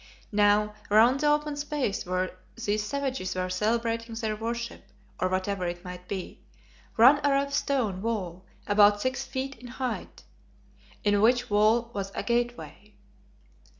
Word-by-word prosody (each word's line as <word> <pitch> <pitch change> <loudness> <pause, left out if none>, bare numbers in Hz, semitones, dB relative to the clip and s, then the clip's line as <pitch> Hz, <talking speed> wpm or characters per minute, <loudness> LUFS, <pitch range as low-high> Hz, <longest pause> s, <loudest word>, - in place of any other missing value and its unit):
Now 210 0 +3 0.2
round 230 +6 +5
the 300 - +1
open 295 0 +1
space 290 -10 -2
where 185 0 -1 0.2
these 215 -2 -1
savages 260 -5 -3
were 185 0 -2
celebrating 230 +3 -1
their 220 -2 -2
worship, 235 +2 -4 0.4
or 185 - +1
whatever 185 0 -1
it 175 0 -5
might 180 0 -8
be, 190 -2 -6 0.6
ran 265 +6 +7
a 290 - +3
rough 280 0 +1
stone 245 -10 0
wall 190 -5 -3 0.2
about 205 0 +5
six 260 +4 -1
feet 265 0 -5
in 245 - -10
height, 255 0 -5 0.8
in 205 -1 +3
which 245 +1 +3
wall 220 +3 +3
was 195 -1 -4
a - - -2
gateway. 240 -3 -3
225 Hz, 145 wpm, -27 LUFS, 200-255 Hz, 0.8 s, ran